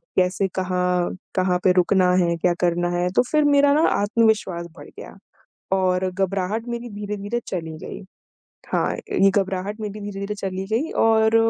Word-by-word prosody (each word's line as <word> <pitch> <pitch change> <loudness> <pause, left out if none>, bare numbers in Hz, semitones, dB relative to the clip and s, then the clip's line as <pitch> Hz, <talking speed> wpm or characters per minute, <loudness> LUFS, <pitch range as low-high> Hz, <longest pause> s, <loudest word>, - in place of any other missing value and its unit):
कैसे 185 +1 +2
कहाँ, 180 -1 0 0.2
कहाँ 185 -1 +2
पे 185 - +5
रुकना 180 0 +3
है, 170 -1 +1
क्या 175 +1 +2
करना 175 0 +1
है, 175 0 +1
तो - - +6
फिर 305 -1 +3
मेरा 285 -1 +4
ना 305 - +3
आत्मविश्वास 205 -5 +1
बढ़ - - -11
गया - - -11 0.6
और 185 0 +1
घबराहट 195 +4 -2
मेरी 235 0 -5
धीरे-धीरे 205 +2 -4
चली 160 -3 -5
गयी। 195 - -8 0.7
हाँ, - - +1
ये 195 - +2
घबराहट 195 +1 -2
मेरी 210 0 -5
धीरे-धीरे 205 0 -5
चली 190 -1 -4
गयी 255 +9 0
और 220 0 +4
195 Hz, 155 wpm, -22 LUFS, 180-215 Hz, 0.7 s, तो